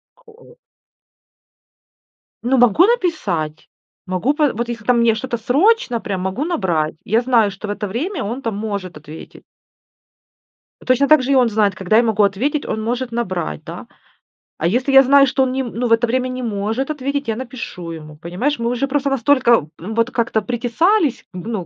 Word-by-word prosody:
Коо 480 0 -19 1.9
Ну, 260 +2 +2
могу 245 - +5
написать. 210 - -1 0.4
Могу, 185 +10 0
пэ 295 -3 +1
вот 235 +2 -3
если 235 0 -1
мне 235 -2 +3
что-то 240 +1 -3
срочно, 270 - +2
прям 195 -3 -4
могу 190 +11 -2
набрать. 175 - -1
Я 225 +4 +1
знаю, 235 -4 +3
что 195 +2 -8
в - - -2
это 205 0 -4
время 290 - -3
он 235 +6 -4
там 225 -5 -3
может 200 -5 -5
ответить. 150 +1 -12 1.4
Точно 255 +2 +3
так 310 -2 +6
же 270 - -1
и - - +4
он 250 -3 +4
знает, 205 -2 +1
когда 190 +3 +1
я 235 - +5
могу 215 -2 +2
ответить, 255 +10 0
он 220 - -3
может 245 +2 -3
набрать, 185 - -3
да? - - -9 0.7
А 165 - 0
если 250 +9 0
я 270 0 +9
знаю, 275 +1 +5
что 265 +1 +1
он 255 - 0
ни 265 - -1
м 245 -3 -5
ну, 245 +2 -1
в - - -4
это 230 +1 +3
время 255 +2 0
не 255 0 -5
может 225 +4 -2
ответить, 280 -1 -3
я 225 - -1
напишу 230 -9 -7
ему, 155 -2 -9
понимаешь? 180 - -2
Мы 235 0 -1
уже 250 +3 -1
просто 280 0 0
настолько, 240 - +3
м, 215 +6 -6
вот 230 +2 +1
как-то 230 -2 0
притесались, 250 - 0
г 185 +5 -7
ну, 205 -7 -3
235 Hz, 185 wpm, -19 LUFS, 205-270 Hz, 1.9 s, я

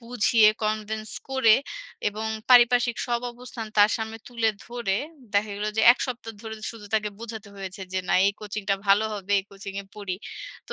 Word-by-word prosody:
বুঝিয়ে 230 -2 +4 0.2
convince 215 0 -2 0.2
করে 230 -5 +5 0.5
এবং 215 +2 -5 0.2
পারিপার্শ্বিক 245 -1 +6
সব 240 -1 0
অবস্থান 240 -2 -8
তার 205 +1 +7
সামনে 220 0 -5
তুলে 230 -2 +1 0.2
ধরে 235 -5 -2 0.4
দেখা 205 +1 +2
গেল 210 +1 -2
যে, - - +3
১ - - -11
সপ্তাহ 240 -2 -6
ধরে 220 0 -6 0.2
শুধু 220 -3 -11
তাকে 210 -1 +1
বোঝাতে 220 -2 -7
হয়েছে 190 0 -7
যে, 185 - 0
না, - - +3
এই 200 - +3
কোচিংটা 205 -1 -2
ভালো 200 +2 +5
হবে, 205 0 -4
এই - - -18
কোচিংএ 195 0 -7
পড়ি। 200 -3 -4 0.5
তো - - -4
220 Hz, 175 wpm, -26 LUFS, 205-235 Hz, 0.5 s, তার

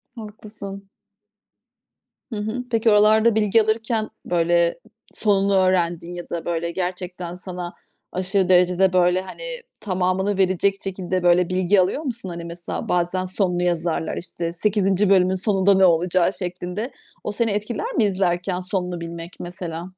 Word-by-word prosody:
Haklısın. 210 -2 -9 1.4
Hı 225 - -5
hı. 220 +4 -3
Peki 225 0 +3
oralarda 215 +2 +5
bilgi 220 +1 +4
alırken, 220 0 0 0.2
böyle, 170 0 +2 0.3
sonunu 200 -2 +2
öğrendiğin 175 -2 +1
ya 175 - -8
da, 170 - -4
böyle, 170 0 -2
gerçekten 180 -1 -4
sana 180 -1 -6 0.4
aşırı 185 0 +1
derecede, 180 +1 +4
böyle, 180 0 +3
hani, 190 - -9 0.4
tamamını 190 0 0
verecek 190 +1 +2
şekilde, 185 -1 -2
böyle, 175 0 +4
bilgi 185 +1 +3
alıyor 190 +11 0
musun? 235 -8 -4
Hani 170 -1 -6
mesela 170 0 -5
bazen 180 +1 0
sonunu 180 -2 0
yazarlar, 170 -2 -1
işte, 170 -1 -4
8. 195 0 +2
bölümün 185 -1 +4
sonunda 195 0 +3
ne 190 0 +5
olacağı 175 +2 +3
şeklinde. 180 +5 -4 0.3
O - - -2
seni 225 0 0
etkiler 235 - -2
mi - - +3
izlerken 185 -2 0
sonunu 180 -2 -3
bilmek 170 +1 -7
mesela? 175 0 -6
185 Hz, 140 wpm, -22 LUFS, 175-205 Hz, 1.4 s, oralarda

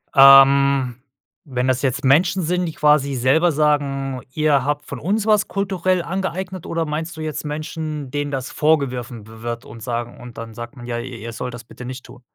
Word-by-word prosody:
Ähm. 135 -2 +7 0.6
Wenn 125 0 0
das 130 -1 +1
jetzt 135 +1 -1
Menschen 175 +7 +3
sind, 180 +2 0
die 160 - -5
quasi 150 -2 +3
selber 135 +8 +3
sagen: 140 -3 0
„Ihr 150 -3 +2
habt 145 0 -1
von - - -7
uns 205 +6 0
was 210 -1 +3
kulturell 185 -2 0
angeeignet“, 190 0 -4
oder 165 -1 -1
meinst 160 +2 -4
du 160 - -6
jetzt 155 -1 -4
Menschen, 150 -2 -5
denen 145 0 -2
das 135 -2 -4
vorgeworfen 130 -7 0
wi 110 0 -13
wird 120 0 -5
und 115 +1 -11
sagen 120 0 -4
und 120 -1 -11
dann 115 0 -7
sagt 120 +4 -8
man: 120 - -9
„Ja, 120 -1 -3
ihr 125 0 -7
ihr 115 +1 -7
sollt 125 +1 -5
das 120 - -10
bitte 125 +2 -11
nicht 130 +1 -7
tun?“ 125 - -14
140 Hz, 200 wpm, -21 LUFS, 125-160 Hz, 0.6 s, Ähm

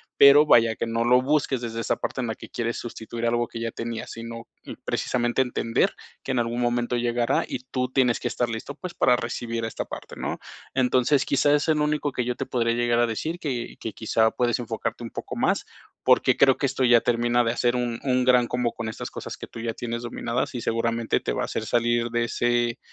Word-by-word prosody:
Pero 140 +2 +8
vaya, 115 -5 +5
que - - -2
no 115 0 0
lo 125 +1 +5
busques 140 -2 +1
desde 115 -1 -4
esa - - 0
parte 130 - -3
en 120 - -2
la 110 - -3
que - - -11
quieres 120 0 -2
sustituir 115 0 -5
algo 120 0 +1
que 115 - -7
ya 115 0 -2
tenías, 115 0 -5
sino, 115 0 -8 0.2
mm, - - -8
precisamente 120 0 0
entender 120 -2 0 0.3
que 135 - -2
en - - 0
algún 120 +1 -1
momento 120 0 0
llegará 120 0 +1
y - - -4
tú 125 -1 -1
tienes 125 -3 +2
que - - -2
estar 120 - -1
listo, 115 +5 -5
pues, 180 -1 -7
para 125 -7 +4
recibir 115 -1 -3
esta - - -4
parte, - - -9
¿no? - - -3 0.4
Entonces, 130 +2 +2
quizá 140 +1 +3
es 145 - 0
el 155 -1 +3
único 150 -1 0
que 125 -2 -2
yo 125 0 -1
te - - -4
podría 115 -2 0
llegar 120 0 +2
a 120 - +3
decir, 155 +10 -3
que 130 -8 -4
que 110 - -5
quizá 110 0 +2
puedes 120 -1 0
enfocarte 115 0 -4
un 115 - -7
poco - - -6
más, - - +1 0.4
porque - - +4
creo 135 -1 +5
que - - 0
esto 135 0 0
ya 120 -1 +6
termina 120 0 +2
de 115 - +2
hacer 120 0 +1
un 120 -1 -1
un 125 -2 +1
gran 125 -1 +5
combo 125 -1 -1
con 115 -1 -4
estas 110 - -6
cosas - - -7
que - - -8
tú - - -10
ya 115 0 -2
tienes 115 0 -4
dominadas, 120 +1 -2
y 120 - -3
seguramente 115 0 0
te - - -2
va - - -1
a - - 0
hacer - - -4
salir 120 0 +1
de 120 0 0
ese 120 0 0
120 Hz, 230 wpm, -25 LUFS, 115-125 Hz, 0.4 s, Pero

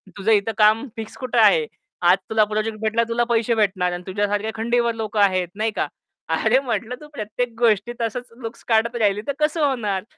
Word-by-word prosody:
तुझं 205 +2 0
इथं 215 +1 +2
काम 215 +4 +4
फिक्स 220 -1 -7
कुठे 255 -2 -3
आहे? 475 -2 +5 0.4
आज 175 +2 +6
तुला 220 -1 +4
प्रोजेक्ट 215 +1 -2
भेटला. 220 +1 +1
तुला 240 +1 +1
पैसे 235 0 +2
भेटणार 190 -4 +1
आणि 175 0 -6
तुझ्यासारख्या 205 +2 -1
खंडीवर 235 +1 +1
लोकं 220 -1 -3
आहेत, 185 -3 +3
नाही 220 +1 0
का? - - 0 0.5
अरे 235 +4 +3
म्हटलं, 235 -2 -3
तू 300 - -11
प्रत्येक 230 0 -3
गोष्टी 230 0 +2
तसंच 240 +2 -3
लुक्स 225 -1 -8
काढत 230 +1 +2
राहिली, 205 -1 +2
तर 280 - 0
कसं 305 0 +1
होणार? 210 -8 -1
220 Hz, 190 wpm, -22 LUFS, 205-235 Hz, 0.5 s, आज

